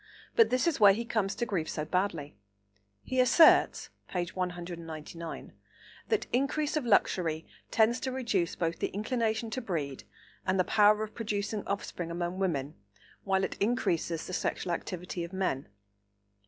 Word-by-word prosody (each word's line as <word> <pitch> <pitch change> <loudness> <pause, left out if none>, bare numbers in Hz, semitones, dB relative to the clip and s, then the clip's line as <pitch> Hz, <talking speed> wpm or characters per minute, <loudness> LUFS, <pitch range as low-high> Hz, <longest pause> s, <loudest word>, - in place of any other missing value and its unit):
But 455 - +6
this 255 +4 +1
is 335 -6 +1
where 205 -2 +8
he 230 +4 -3
comes 215 -4 -1
to 240 - -1
grief 180 -8 -2
so 150 - -3
badly. 165 - -1 0.7
He 260 - -2
asserts 280 +6 +5 0.2
(p. 175 -1 -2
199) 170 -3 -6 0.6
that 440 -2 +1
"increase 280 +4 +1
of 295 -6 -1
luxury 165 -6 +2 0.2
tends 230 +2 +3
to 260 - -3
reduce 225 -9 -1
both 165 -1 -2
the - - 0
inclination 220 +1 -1
to 255 - -2
breed 150 - -3 0.4
and 185 0 +1
the - - +5
power 210 +2 +4
of 215 - -7
producing 210 -1 -2
offspring 180 -3 -3
among 175 +2 -3
women, 150 -7 -1 0.5
while 190 -1 +2
it - - -2
increases 175 -8 0
the 185 - -7
sexual 175 0 -1
activity 180 0 -4
of 170 +2 -8
men." 180 - -1
195 Hz, 155 wpm, -30 LUFS, 170-230 Hz, 0.7 s, where